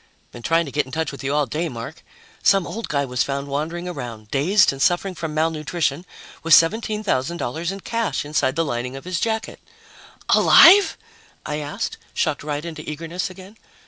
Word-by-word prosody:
"Been 120 Hz, -, -10 dB
trying 165 Hz, +6 st, +2 dB
to 140 Hz, -, -8 dB
get 145 Hz, -1 st, -1 dB
in -, -, -12 dB
touch 160 Hz, +1 st, -2 dB
with 140 Hz, -, -9 dB
you 140 Hz, +2 st, -1 dB
all 150 Hz, -1 st, +2 dB
day, 160 Hz, +4 st, -3 dB
Mark. 125 Hz, +5 st, -8 dB, 0.4 s
Some 195 Hz, -3 st, +4 dB
old 230 Hz, +1 st, -5 dB
guy 140 Hz, -1 st, 0 dB
was 125 Hz, -1 st, -2 dB
found 140 Hz, 0 st, -2 dB
wandering 165 Hz, +5 st, -3 dB
around, 120 Hz, -10 st, -7 dB
dazed 185 Hz, +9 st, +4 dB
and 135 Hz, 0 st, -7 dB
suffering 180 Hz, +4 st, +2 dB
from 160 Hz, -3 st, -5 dB
malnutrition, 160 Hz, +1 st, -1 dB, 0.3 s
with 165 Hz, 0 st, +6 dB
$17,000 170 Hz, -, 0 dB
in 195 Hz, -, -6 dB
cash 230 Hz, -8 st, -2 dB
inside 145 Hz, -3 st, 0 dB
the 165 Hz, +1 st, +1 dB
lining 125 Hz, -1 st, -3 dB
of 135 Hz, -, -9 dB
his 180 Hz, -1 st, -2 dB
jacket." 225 Hz, +1 st, -2 dB, 0.7 s
"Alive?" 390 Hz, +4 st, +7 dB, 0.5 s
I 150 Hz, -, -3 dB
asked, 145 Hz, -1 st, -4 dB, 0.2 s
shocked 150 Hz, -2 st, 0 dB
right 150 Hz, +1 st, -4 dB
into 160 Hz, -2 st, -6 dB
eagerness 165 Hz, +4 st, -4 dB
again. 190 Hz, +3 st, -13 dB
160 Hz, 175 wpm, -22 LUFS, 140-180 Hz, 0.7 s, Alive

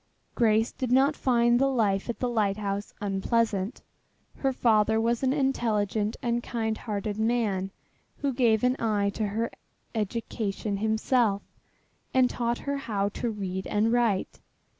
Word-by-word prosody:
Grace 225 Hz, -1 st, +3 dB
did 255 Hz, -2 st, -4 dB
not 275 Hz, +4 st, +4 dB
find 240 Hz, -2 st, +3 dB
the 275 Hz, -, +4 dB
life 210 Hz, -5 st, +1 dB
at 235 Hz, -, -2 dB
the 250 Hz, -, -1 dB
lighthouse 205 Hz, -3 st, -1 dB
unpleasant. 205 Hz, +2 st, 0 dB, 0.5 s
Her 270 Hz, -, +1 dB
father 220 Hz, -3 st, +3 dB
was 230 Hz, +1 st, +1 dB
an 260 Hz, -1 st, +2 dB
intelligent 225 Hz, -6 st, 0 dB
and 240 Hz, 0 st, 0 dB
kind 225 Hz, -2 st, -2 dB
hearted 210 Hz, -1 st, -4 dB
man 220 Hz, -5 st, 0 dB, 0.5 s
who 280 Hz, -2 st, -1 dB
gave 230 Hz, -3 st, +3 dB
an 250 Hz, +1 st, +3 dB
eye 205 Hz, -3 st, +1 dB
to 215 Hz, +1 st, -2 dB
her 225 Hz, +3 st, -2 dB, 0.4 s
education 215 Hz, -2 st, -2 dB
himself, 220 Hz, 0 st, +1 dB, 0.7 s
and 255 Hz, -1 st, +4 dB
taught 235 Hz, 0 st, -1 dB
her 280 Hz, 0 st, -3 dB
how 210 Hz, -6 st, -1 dB
to 235 Hz, +3 st, -3 dB
read 190 Hz, -3 st, -4 dB
and 215 Hz, +2 st, +1 dB
write. 230 Hz, -6 st, +1 dB
225 Hz, 140 wpm, -27 LUFS, 205-240 Hz, 0.7 s, not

